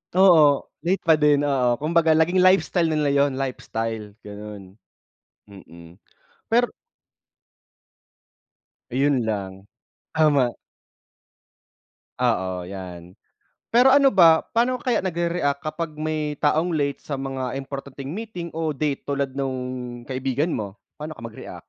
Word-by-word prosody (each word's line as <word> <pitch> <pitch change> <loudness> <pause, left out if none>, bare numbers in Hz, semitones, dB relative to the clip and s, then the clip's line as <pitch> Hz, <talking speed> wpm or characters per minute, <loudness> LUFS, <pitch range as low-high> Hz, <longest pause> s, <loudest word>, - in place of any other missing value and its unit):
Oo, 160 -7 +6 0.2
late 190 +2 +1
pa 160 -3 +4
din, 145 -1 +4
oo, 130 -4 +2
kumbaga 160 +3 +2
naging 175 +4 +3
lifestyle 185 -2 +3
nila 150 -2 +1
yun 140 -1 +2
lifestyle 115 -5 -4
ganon, 105 -1 -10 0.7
mm. 85 -2 -14 0.5
Pero 245 +1 +4 2.2
Ayun 135 +1 +2
lang 100 -3 -3 0.6
tama. 145 -6 +3 1.6
Oo, 95 -8 -1
yan. 90 -2 -9 0.6
Pero 250 +3 +6
ano 280 -1 +6
ba? 165 -4 +6
Paano 245 +2 0
kaya 250 - +1
nagrereact 170 -5 -1
kapag 155 0 -4
may 155 -1 -2
taong 160 +3 +1
late 140 -2 -1
sa 145 - -6
mga 135 -2 -4
importanteng 140 0 -7
meeting 180 -3 -6
o 160 -2 -2
date 145 0 -2
tulad 140 -1 -1
nung 125 -2 -4
kaibigan 135 +4 -1
mo, 100 -8 -4 0.2
paano 155 +1 -6
ka 115 - -13
mag-react? 115 -1 -9
140 Hz, 115 wpm, -23 LUFS, 120-160 Hz, 2.2 s, Oo